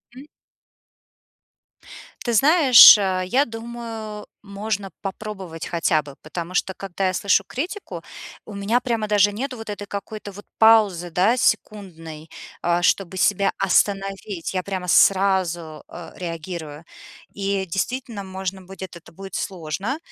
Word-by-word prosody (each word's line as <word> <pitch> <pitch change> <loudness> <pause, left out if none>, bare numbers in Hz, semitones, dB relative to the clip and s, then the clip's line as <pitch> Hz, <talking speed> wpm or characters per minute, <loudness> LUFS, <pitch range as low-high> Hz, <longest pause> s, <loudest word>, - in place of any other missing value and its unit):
М. 270 +3 -12 2.0
Ты 240 - 0
знаешь, 275 - +9
э, 185 -2 0
я 265 +8 +2
думаю, 225 -2 -7 0.2
можно 200 -1 -4
попробовать 190 -4 -6
хотя 165 -2 +1
бы. 140 -1 -12
Потому 170 +3 -6
что 190 +1 0
когда 195 0 -3
я 185 - -1
слышу 200 +1 +2
критику, 360 +10 -5 0.4
у 215 - -10
меня 200 +4 0
прямо 230 -4 -2
даже 205 -1 +4
нету 255 +5 -4
вот 225 -1 -9
этой 205 0 -6
какой-то 205 +1 -7
вот 205 +1 -12
паузы, 210 -6 +4
да, 200 +9 +2
секундной, 165 -10 -2 0.3
э, 175 0 +1
чтобы 190 +1 +1
себя 195 +2 +2
остановить. 195 -1 0
Я 185 -1 -1
прямо 185 -2 -5
сразу, 175 -5 +2
э, 175 -1 -10
реагирую. 165 -3 -6 0.5
И, 195 -1 -2
действительно, 205 +4 -4
можно 190 0 -5
будет, 190 -1 -10
это 170 - -16
будет 190 +1 -9
сложно, 190 - -3
195 Hz, 130 wpm, -22 LUFS, 180-215 Hz, 2.0 s, знаешь